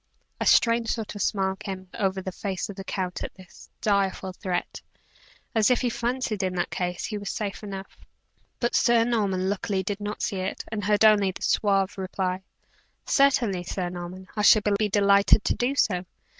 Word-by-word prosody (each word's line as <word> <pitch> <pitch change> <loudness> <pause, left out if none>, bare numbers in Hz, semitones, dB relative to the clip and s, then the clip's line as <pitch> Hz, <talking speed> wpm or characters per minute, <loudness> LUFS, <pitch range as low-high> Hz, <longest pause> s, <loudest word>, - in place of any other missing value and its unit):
A - - 0
strange 230 -1 +4
sort 225 -3 -3
of 205 - -6
smile 190 -2 0
came 190 -2 -7
over 190 -2 -1
the 190 - -4
face 190 +1 -4
of 200 - -7
the 195 - -7
count 185 -2 -3
at - - -6
this 185 -2 -15
direful 195 -2 0
threat, 180 -2 -3 0.7
as 220 0 +4
if 250 - +3
he 245 -2 0
fancied 240 -3 -2
in 185 -1 -1
that 175 - -1
case, 180 -1 -2
he 210 -2 -4
was 200 - -5
safe 205 -2 -4
enough; 195 -2 -8 0.6
but 240 - 0
Sir 235 -1 +4
Norman, 200 -6 0
luckily, 195 -1 -1
did 205 +2 -3
not 205 0 -4
see 200 - -1
it, 185 +1 -3
and 210 -3 -3
heard 210 +1 +4
only 205 -3 +5
the 185 - -7
suave 195 -2 +1
reply: 185 0 -2 0.6
"Certainly, 235 -10 +2
Sir 180 -1 -3
Norman; 180 +1 -7
I 210 - 0
shall 210 0 +6
be 210 +1 0
delighted 200 +1 +4
to - - +1
do 255 +3 -1
so. 180 -8 +1
200 Hz, 185 wpm, -26 LUFS, 190-215 Hz, 0.7 s, shall